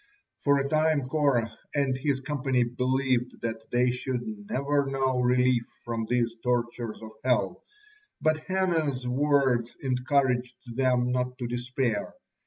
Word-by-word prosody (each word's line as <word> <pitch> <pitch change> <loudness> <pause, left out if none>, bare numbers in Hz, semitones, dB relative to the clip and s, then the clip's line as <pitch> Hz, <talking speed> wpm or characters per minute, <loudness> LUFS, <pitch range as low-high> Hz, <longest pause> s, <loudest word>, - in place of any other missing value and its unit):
For 140 -1 +3
a 140 0 0
time 155 -2 +2
Korah 130 -7 +1 0.2
and 140 -2 +2
his 135 0 -1
company 135 -3 +1
believed 125 +1 0
that 115 -1 -4
they 125 +1 +3
should 125 0 -2 0.3
never 140 -6 +1
know 135 -1 0
relief 125 -1 +3 0.2
from 115 -2 -2
these 120 -1 +1
tortures 120 -2 -2
of 110 - -8
hell, 125 -1 +1 0.6
but 155 0 +2
Hannah's 160 -9 0
words 130 -3 +2
encouraged 125 -1 +1 0.2
them 125 -1 +2
not 125 0 -1
to 125 - -4
despair. 120 -2 -2
125 Hz, 130 wpm, -28 LUFS, 120-140 Hz, 0.6 s, For